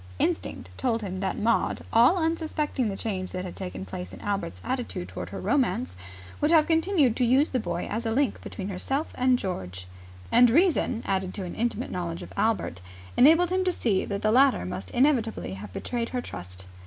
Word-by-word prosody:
Instinct 90 Hz, -, -2 dB
told 230 Hz, -3 st, 0 dB
him 190 Hz, -2 st, -4 dB
that 195 Hz, 0 st, -2 dB
Maud, 230 Hz, +2 st, +1 dB
all 245 Hz, +11 st, +6 dB
unsuspecting 315 Hz, -6 st, -1 dB
the 195 Hz, -, -4 dB
change 190 Hz, -4 st, -3 dB
that 185 Hz, 0 st, -3 dB
had 180 Hz, -, -7 dB
taken 95 Hz, +1 st, -6 dB
place 90 Hz, -1 st, -6 dB
in 95 Hz, -, -10 dB
Albert's 195 Hz, -, -3 dB
attitude 255 Hz, -2 st, -3 dB
toward -, -, -6 dB
her -, -, -6 dB
romance, 250 Hz, -4 st, 0 dB, 0.5 s
would 295 Hz, -, +3 dB
have 320 Hz, -2 st, +6 dB
continued 325 Hz, -, +3 dB
to 255 Hz, -, +1 dB
use 260 Hz, +5 st, +3 dB
the 255 Hz, -, +1 dB
boy -, -, -3 dB
as 225 Hz, +3 st, -3 dB
a 225 Hz, -, -1 dB
link 275 Hz, +4 st, +1 dB
between 195 Hz, -2 st, -6 dB
herself 270 Hz, -, -2 dB
and 255 Hz, 0 st, +3 dB
George: 90 Hz, -, -5 dB, 0.5 s
and 245 Hz, +1 st, +7 dB
reason, 295 Hz, -5 st, +2 dB
added 190 Hz, -1 st, -1 dB
to 200 Hz, -, -4 dB
an 180 Hz, -, -5 dB
intimate 235 Hz, +1 st, -2 dB
knowledge 170 Hz, -2 st, -4 dB
of -, -, -11 dB
Albert, 210 Hz, -, 0 dB, 0.3 s
enabled 330 Hz, +6 st, +6 dB
him 375 Hz, 0 st, +2 dB
to 370 Hz, -, +2 dB
see 210 Hz, -, 0 dB
that 200 Hz, -1 st, -4 dB
the 215 Hz, -, +3 dB
latter 265 Hz, -, +4 dB
must 90 Hz, +1 st, -5 dB
inevitably 240 Hz, -, +1 dB
have 95 Hz, 0 st, -8 dB
betrayed 235 Hz, -, -3 dB
her 250 Hz, -, -2 dB
trust. 90 Hz, -, -8 dB
230 Hz, 195 wpm, -27 LUFS, 185-270 Hz, 0.5 s, and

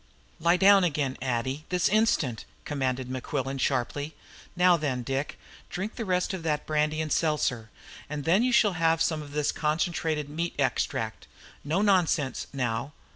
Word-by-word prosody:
"Lie 170 Hz, +2 st, +3 dB
down 195 Hz, 0 st, +6 dB
again, 145 Hz, -6 st, 0 dB
Addie, 130 Hz, +3 st, -2 dB
this 180 Hz, -2 st, +2 dB
instant!" 190 Hz, -, +1 dB, 0.2 s
commanded 130 Hz, -3 st, -2 dB
Mequillen 135 Hz, +1 st, -3 dB
sharply. 140 Hz, +3 st, -1 dB, 0.4 s
"Now 180 Hz, 0 st, +5 dB
then, 135 Hz, -6 st, -2 dB
Dick, 135 Hz, +4 st, -3 dB, 0.3 s
drink 200 Hz, +5 st, -4 dB
the 230 Hz, -, -4 dB
rest 180 Hz, 0 st, 0 dB
of 190 Hz, -, -4 dB
that 150 Hz, -2 st, -1 dB
brandy 155 Hz, 0 st, 0 dB
and 155 Hz, -1 st, -4 dB
seltzer, 135 Hz, -8 st, 0 dB, 0.4 s
and 150 Hz, -1 st, -4 dB
then 180 Hz, +6 st, +4 dB
you 250 Hz, +1 st, +2 dB
shall 215 Hz, -4 st, +4 dB
have 165 Hz, -1 st, +2 dB
some 160 Hz, -1 st, +1 dB
of 145 Hz, -1 st, -10 dB
this 150 Hz, -1 st, +1 dB
concentrated 155 Hz, -1 st, -1 dB
meat 165 Hz, +4 st, -3 dB
extract. -, -, -1 dB, 0.4 s
No 165 Hz, +8 st, 0 dB
nonsense, 175 Hz, -9 st, +1 dB
now. 130 Hz, +1 st, -2 dB
150 Hz, 155 wpm, -27 LUFS, 135-175 Hz, 0.4 s, down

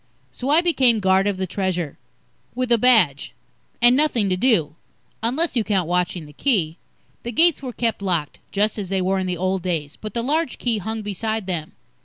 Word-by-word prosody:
So 255 Hz, -, -5 dB
I 310 Hz, +4 st, +5 dB
became 260 Hz, -10 st, +3 dB
guard 190 Hz, 0 st, +3 dB
of 200 Hz, -2 st, -1 dB
the 190 Hz, -, -2 dB
Treasure. 180 Hz, -5 st, -3 dB, 0.6 s
With 255 Hz, -1 st, -2 dB
a 235 Hz, -, +5 dB
badge. 210 Hz, -, +3 dB, 0.5 s
And 240 Hz, +1 st, +7 dB
nothing 255 Hz, -8 st, +2 dB
to 185 Hz, -, +1 dB
do 185 Hz, -, +1 dB, 0.5 s
unless 265 Hz, +9 st, 0 dB
you 235 Hz, -, +2 dB
count 195 Hz, -5 st, 0 dB
watching 180 Hz, -1 st, -1 dB
the 150 Hz, -, -14 dB
Key. 175 Hz, -, 0 dB, 0.4 s
The 235 Hz, -, -5 dB
gates 330 Hz, +5 st, +3 dB
were 260 Hz, -2 st, -5 dB
kept 230 Hz, -3 st, -2 dB
locked, 175 Hz, -6 st, -2 dB
just 210 Hz, +2 st, 0 dB
as 195 Hz, -3 st, -4 dB
they 195 Hz, -1 st, 0 dB
were 190 Hz, +1 st, +1 dB
in 185 Hz, -, -2 dB
the 180 Hz, -1 st, -2 dB
old 185 Hz, +2 st, -1 dB
days, 160 Hz, -5 st, -3 dB
but 215 Hz, 0 st, -8 dB
the 235 Hz, -, 0 dB
large 305 Hz, +2 st, -1 dB
Key 230 Hz, -3 st, -1 dB
hung 220 Hz, +2 st, -4 dB
beside 220 Hz, +1 st, -3 dB
them. 170 Hz, -5 st, -4 dB
205 Hz, 200 wpm, -22 LUFS, 180-240 Hz, 0.6 s, And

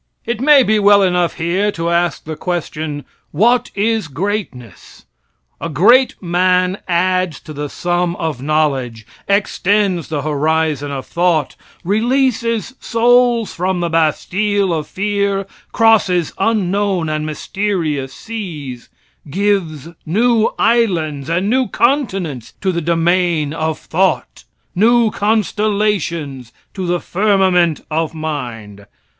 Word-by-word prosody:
It 235 Hz, -1 st, -3 dB
may 285 Hz, -1 st, +6 dB
be 215 Hz, -2 st, +2 dB
well 200 Hz, 0 st, +5 dB
enough 180 Hz, -2 st, +1 dB
here 180 Hz, +5 st, 0 dB
to 170 Hz, 0 st, -2 dB
ask 175 Hz, 0 st, 0 dB
the 155 Hz, 0 st, -6 dB
question: 155 Hz, -4 st, -4 dB, 0.2 s
"What 235 Hz, +9 st, +2 dB
is 215 Hz, -2 st, 0 dB
greatness?" 145 Hz, -, -5 dB, 0.5 s
A 165 Hz, -, -4 dB
great 235 Hz, -, +4 dB
man 180 Hz, +1 st, +1 dB
adds 185 Hz, -2 st, 0 dB
to 155 Hz, -, -10 dB
the 145 Hz, 0 st, -5 dB
sum 175 Hz, +1 st, -1 dB
of 155 Hz, -7 st, -4 dB
knowledge, 135 Hz, -7 st, -1 dB, 0.2 s
extends 200 Hz, -3 st, +1 dB
the 150 Hz, -3 st, -3 dB
horizon 155 Hz, -1 st, 0 dB
of 135 Hz, -2 st, -5 dB
thought, 170 Hz, -4 st, 0 dB, 0.3 s
releases 230 Hz, +3 st, 0 dB
souls 240 Hz, -1 st, +2 dB
from 185 Hz, +1 st, -1 dB
the 170 Hz, -1 st, -1 dB
Bastille 190 Hz, +5 st, +1 dB
of 155 Hz, -2 st, -3 dB
fear, 200 Hz, 0 st, -1 dB, 0.3 s
crosses 200 Hz, -7 st, +3 dB
unknown 195 Hz, -4 st, 0 dB
and 155 Hz, 0 st, -2 dB
mysterious 155 Hz, -4 st, -2 dB
seas, 155 Hz, -, -7 dB, 0.4 s
gives 180 Hz, -5 st, -1 dB, 0.2 s
new 225 Hz, +6 st, +2 dB
islands 170 Hz, -, +1 dB
and 175 Hz, +4 st, 0 dB
new 255 Hz, +3 st, +2 dB
continents 195 Hz, -, -1 dB
to 190 Hz, -, +1 dB
the 170 Hz, -1 st, -2 dB
domain 170 Hz, -2 st, +1 dB
of 160 Hz, -1 st, -2 dB
thought, 190 Hz, +3 st, -1 dB, 0.3 s
new 230 Hz, +3 st, +3 dB
constellations 205 Hz, -, -1 dB, 0.2 s
to 190 Hz, -2 st, -4 dB
the 175 Hz, 0 st, 0 dB
firmament 185 Hz, -5 st, +2 dB
of 160 Hz, +1 st, -1 dB
mind. 120 Hz, -10 st, -6 dB
180 Hz, 115 wpm, -17 LUFS, 155-205 Hz, 0.5 s, may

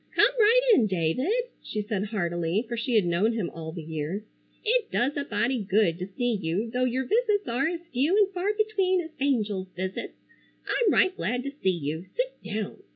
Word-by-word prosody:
"Come -, -, +5 dB
right 455 Hz, +3 st, +6 dB
in, 235 Hz, -, +5 dB
David," 185 Hz, -, 0 dB, 0.3 s
she 210 Hz, -1 st, -4 dB
said 205 Hz, -2 st, -2 dB
heartily, 175 Hz, 0 st, -1 dB
for 235 Hz, -, -3 dB
she 235 Hz, +1 st, -1 dB
had 210 Hz, -4 st, +4 dB
known 180 Hz, +7 st, +2 dB
him 210 Hz, -7 st, -2 dB
all 160 Hz, -1 st, -7 dB
the 165 Hz, -1 st, -7 dB
years, 160 Hz, +6 st, -4 dB, 0.4 s
"it 460 Hz, 0 st, +2 dB
does 265 Hz, +4 st, 0 dB
a 285 Hz, -, -1 dB
body 235 Hz, 0 st, 0 dB
good 190 Hz, -4 st, +2 dB
to 180 Hz, -, -4 dB
see 245 Hz, +5 st, -1 dB
you 185 Hz, +8 st, -1 dB
though 250 Hz, +2 st, +1 dB
your 255 Hz, +1 st, 0 dB
visits 420 Hz, -, +1 dB
are 250 Hz, +5 st, +1 dB
as 340 Hz, 0 st, -4 dB
few 290 Hz, +10 st, +2 dB
and 405 Hz, -2 st, +4 dB
far 375 Hz, +3 st, 0 dB
between 395 Hz, -4 st, +2 dB
as 325 Hz, -1 st, -8 dB
angels' 210 Hz, -9 st, 0 dB
visits. 185 Hz, +1 st, -4 dB, 0.5 s
I'm 455 Hz, -6 st, +2 dB
right 375 Hz, -1 st, +3 dB
glad 245 Hz, -, -2 dB
to 280 Hz, -, -4 dB
see 280 Hz, -9 st, -1 dB
you! 160 Hz, -1 st, -2 dB
Sit -, -, 0 dB
down." 210 Hz, -1 st, -4 dB
230 Hz, 200 wpm, -27 LUFS, -, 0.5 s, right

